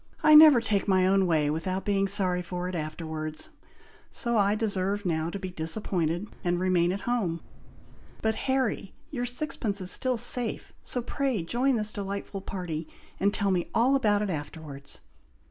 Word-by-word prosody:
I 305 0 +6
never 305 -4 +9
take 210 -3 -1
my 185 -2 +3
own 190 0 +3
way 155 -3 +2
without 185 +5 -3
being 195 -1 +1
sorry 185 -2 +3
for 180 0 -5
it 185 - -5
afterwards, 155 -1 -4 0.6
so 235 -1 +1
I 205 -1 +3
deserve 205 -2 -1
now 160 -2 -1
to 200 - -5
be 185 -1 -6
disappointed 170 +1 -1 0.2
and 175 -1 0
remain 180 -1 +2
at 195 +1 -4
home; 195 -8 -1 0.8
but, 220 0 +2
Harry, 260 -5 -2 0.2
your 245 -4 -3
sixpence 245 -5 -1
is 185 -1 0
still 255 -2 +2
safe, 240 0 +1
so 245 - -1
pray 255 -6 -2
join 250 +9 +1
this 215 -1 +1
delightful 200 0 -5
party, 175 -5 -5 0.3
and 200 +1 +2
tell 200 -1 0
me 180 -2 -1
all 250 +4 +4
about 210 -6 +2
it 200 - -2
afterwards." 145 -2 -7
195 Hz, 165 wpm, -27 LUFS, 175-225 Hz, 0.8 s, never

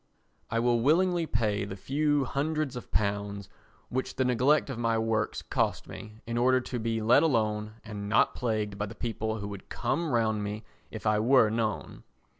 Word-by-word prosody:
I 115 - -1
will 120 0 +2
willingly 170 +4 +3
pay 105 -5 0
the 100 -1 -5
few 145 +6 +1
hundreds 150 +1 -1
of 125 - -7
pounds 100 0 -1 0.4
which 130 +1 -3
the 130 - +1
neglect 130 +4 +3
of 120 - -5
my 115 -1 +1
works 110 0 -1
costs - - -1
me 110 +1 -10
in 115 +1 -2
order 130 +1 +4
to 125 -1 -4
be 115 -1 -1
let 115 +3 +6
alone 110 -7 0
and 100 -1 -6
not 110 - +4
plagued 105 -4 -2
by 105 - -1
the - - -9
people 110 -1 -3
who 100 -1 -5
would 100 -2 -9
come 155 +6 -1
round 110 -3 +1
me 105 +2 -4 0.3
if - - -8
I 105 0 +3
were 115 -1 +5
known. 110 -2 -2
115 Hz, 185 wpm, -29 LUFS, 105-130 Hz, 0.4 s, let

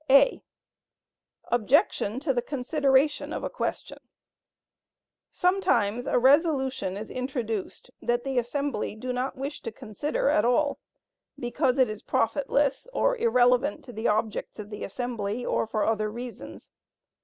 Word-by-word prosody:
(a) 275 - +6 1.1
Objection 245 - +2
to 275 -1 0
the 240 - 0
consideration 280 +2 +1
of - - -4
a - - -3
question. - - -4 1.3
Sometimes 245 - +1
a - - +2
resolution 265 - +3
is 215 +1 -7
introduced 250 -3 -4
that 240 0 0
the 270 -2 0
assembly 245 -3 -2
do 250 +3 -4
not 250 +2 -2
wish 275 +3 -5
to 230 - -5
consider 255 +7 -3
at 305 +2 +3
all, 280 +4 +2 0.6
because 250 +2 0
it 260 -2 +5
is 215 -1 -6
profitless, 275 - 0
or - - +2
irrelevant 255 - +3
to 245 - -10
the 220 +1 -1
objects 215 0 -1
of 210 0 -8
the 210 - -6
assembly, 235 0 -3
or - - 0
for 215 -1 0
other 215 -1 0
reasons. 240 +2 -9
250 Hz, 135 wpm, -27 LUFS, 225-280 Hz, 1.3 s, a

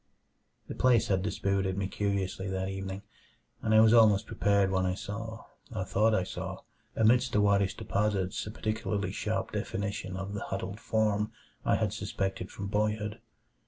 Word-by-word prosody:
The - - -5
place 125 -3 +3
had 95 -2 +2
dispirited 100 -1 0
me 100 -1 0
curiously 95 -1 -2
that 95 0 -2
evening, 95 0 -5 0.6
and 110 - -1
I 110 0 +7
was 110 0 +6
almost 110 -4 +6
prepared 100 -1 +2
when 95 -1 +2
I 90 0 0
saw 110 +3 -6 0.3
or 95 - -3
thought 110 +4 +3
I 95 - +2
saw - - -5 0.3
amidst 120 +3 +4
the 105 - +3
whitish 100 -1 +3
deposits 100 -3 -1
a - - -4
particularly 105 -2 -2
sharp - - -2
definition 100 -2 -3
of 95 +1 -5
the 105 - -4
"huddled 95 +2 -4
form" 105 -1 +1 0.3
I - - +3
had 105 -2 0
suspected 95 -3 -3
from 100 - -6
boyhood. 105 +1 -1
100 Hz, 160 wpm, -30 LUFS, 95-110 Hz, 0.6 s, I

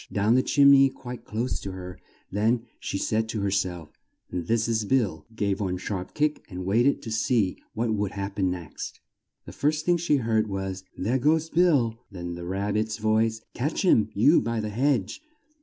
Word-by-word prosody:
down 105 +3 +2
the 130 - +5
chim 140 +1 +5
ney 135 -1 +7
quite 125 -2 -9
close 115 +4 -2
to 95 - -6
her; 90 -1 -8 0.3
then 115 +4 +1 0.2
she - - -3
said 110 +3 0
to 110 -3 -2
her 100 -1 0
self: 90 -5 -2 0.4
"This 110 +6 0
is 110 -2 +1
Bill," 115 -1 0
gave 100 -2 0
one 90 -2 -1
sharp 95 0 -5
kick 150 0 0
and 90 -2 -6
wait 115 +7 +3
ed 140 - +1
to 115 - -6
see 110 -3 +1 0.2
what 115 0 0
would 105 -2 -1
hap 100 0 -5
pen 95 -2 +2
next. 90 -4 -6 0.5
The - - -9
first 150 +1 0
thing 175 0 +3
she 170 -3 +2
heard 110 -4 +1
was, 95 -1 -4
"There 120 +8 0
goes 160 +4 +2
Bill!" 140 -10 +3
then 85 -3 -6
the 85 0 -7
Rab 100 +2 -1
bit's 110 0 -1
voice, 110 +1 +1
"Catch 145 +10 -2
him, 110 - +4
you 140 +11 +5
by 115 0 -2
the 105 -1 -2
hedge!" 135 - 0
110 Hz, 195 wpm, -26 LUFS, 95-125 Hz, 0.5 s, ney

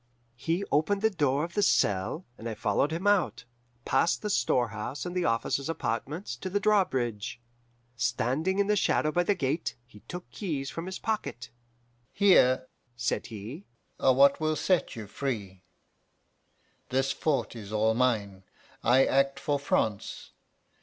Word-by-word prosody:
"He 165 +10 -1
opened 195 +8 +1
the 220 - +4
door 145 -5 +1
of 170 +1 -5
the 205 - +1
cell, 105 - +1
and 115 -1 -6
I 110 - -4
followed 105 +9 +1
him 170 +4 -3
out, 205 -6 +2 0.4
past 135 +10 +2
the 210 - -1
storehouse 120 - 0
and 180 0 -5
the 180 - +1
officers' 115 +5 0
apartments, 150 - -3
to 185 - -5
the 205 +2 0
drawbridge. 130 - 0 0.6
Standing 145 +10 0
in 200 - +3
the 210 +1 +2
shadow 155 -5 +2
by 175 - +2
the 200 +3 +1
gate, 150 0 -1
he 115 -4 -16
took 180 0 -7
keys 145 -9 -3
from 165 +2 -5
his 190 - -4
pocket. 130 - -3 0.6
'Here,' 130 -11 +5 0.3
said 120 - -1
he, 115 - -8 0.3
'are 130 -1 +4
what 140 +1 +5
will 155 0 +1
set 185 +3 +1
you 110 -2 -6
free. 100 -5 -4 1.3
This 135 +1 +1
fort 140 -2 -1
is 105 -3 -8
all 110 +1 +2
mine: 110 -6 0 0.4
I 130 +3 +5
act 135 0 +2
for 145 -1 0
France. 110 -7 -1
140 Hz, 155 wpm, -28 LUFS, 120-180 Hz, 1.3 s, Here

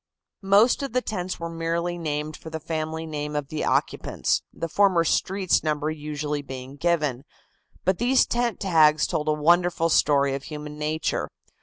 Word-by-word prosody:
Most 205 +7 +4
of 275 -4 -4
the 255 - +2
tents 185 -4 -4
were 170 - -4
merely 165 +1 -2
named 155 -2 -3
for 160 - -10
the 160 0 -5
family 160 0 -4
name 150 -1 -4
of 145 -2 -3
the 155 - -3
occupants, - - 0
the 165 - -4
former 185 -1 +3
streets 185 +3 +1
number 155 0 -1
usually 150 -1 -4
being 130 0 -8
given. 150 -5 0 0.6
But 185 0 +1
these 250 +2 +4
tent 240 -1 -1
tags 155 -5 +4
told 150 - -2
a 155 - +3
wonderful 170 +2 +2
story 140 -3 +3
of 135 0 -5
human 150 -1 -7
nature. 155 +1 -1
160 Hz, 165 wpm, -25 LUFS, 150-175 Hz, 0.6 s, Most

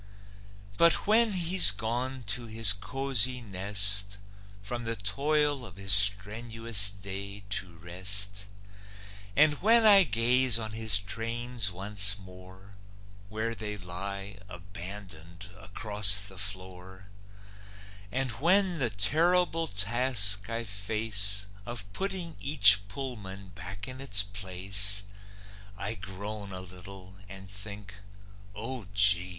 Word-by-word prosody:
But 170 0 +2
when 220 +1 +3
he's 180 - +4
gone 120 +5 -3
to 115 +3 -5
his 110 -2 +3
cozy 130 +2 -1
nest, 100 -1 -2 0.5
From 120 +4 -6
the 115 0 -4
toil 145 +6 -2
of 95 -6 -13
his 95 -1 +1
strenuous 105 +2 +7
day 100 +1 -9
to 90 -4 -4
rest, 100 +4 -1 0.9
And 150 0 +2
when 225 +3 +3
I 200 -2 +7
gaze 120 0 +2
on 110 -2 -6
his 110 -2 +3
trains 115 +1 -4
once 100 +2 -2
more, 95 0 -16 0.6
Where 110 +2 -4
they 105 -2 -7
lie, 100 +2 -7
abandoned, 90 -1 -10
across 105 -1 +1
the 95 -3 -9
floor, 95 -1 -9 1.1
And 130 0 -2
when 180 +1 +1
the 125 -4 -1
terrible 165 - 0
task 105 -1 0
I 115 +1 -5
face 105 -1 -1 0.2
Of 105 -3 -4
putting 185 - -6
each 105 -8 +5
"Pullman" 100 -5 -9
back 95 +2 -8
in 130 +1 -10
its 105 -7 +1
place, 100 0 +1 0.7
I 100 +3 -4
groan 100 +1 -8
a 95 0 -4
little, 95 +1 -11
and 95 0 -12
think, 100 0 -11 0.6
"O 115 0 -8
gee! 100 -2 +2
105 Hz, 115 wpm, -27 LUFS, 100-120 Hz, 1.1 s, strenuous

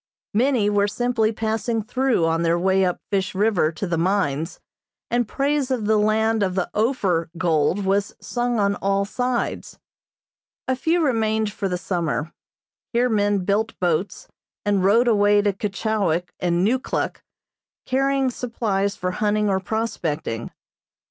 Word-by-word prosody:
Many 240 -1 +2
were 205 0 +2
simply 225 0 0
passing 225 +1 -1
through 245 -5 +1
on 165 0 +1
their 170 0 +2
way 190 +2 +2
up 180 -1 0
Fish 195 -1 -1
River 195 -6 +2
to 160 - -4
the 170 -3 -1
mines, 165 -4 0 0.5
and 240 -1 +1
praise 280 +1 0
of 250 -5 -1
the 215 0 +3
land 220 +1 +2
of 185 -2 0
the 185 - -1
"Ophir" 200 -8 +1
gold 165 +3 +1
was 200 +1 0
sung 240 -1 -2
on 200 -1 +2
all 195 0 0
sides. 245 +3 -2 0.9
A 260 - +1
few 325 +5 +1
remained 220 -4 +1
for 195 -2 -2
the 180 - -1
summer. 170 -3 -2 0.6
Here 245 +1 +2
men 205 -3 +1
built 215 +3 0
boats, 180 +2 -1 0.4
and 200 -2 +2
rowed 225 +6 +4
away 205 -2 +4
to 205 -1 +2
Keechawik 195 -4 -1
and 175 +1 +1
Neukluk, 255 +4 -1 0.6
carrying 270 0 +1
supplies 210 -5 -1
for 180 0 -2
hunting 210 +1 +1
or 190 - +1
prospecting. 175 - -3
205 Hz, 145 wpm, -23 LUFS, 185-230 Hz, 0.9 s, rowed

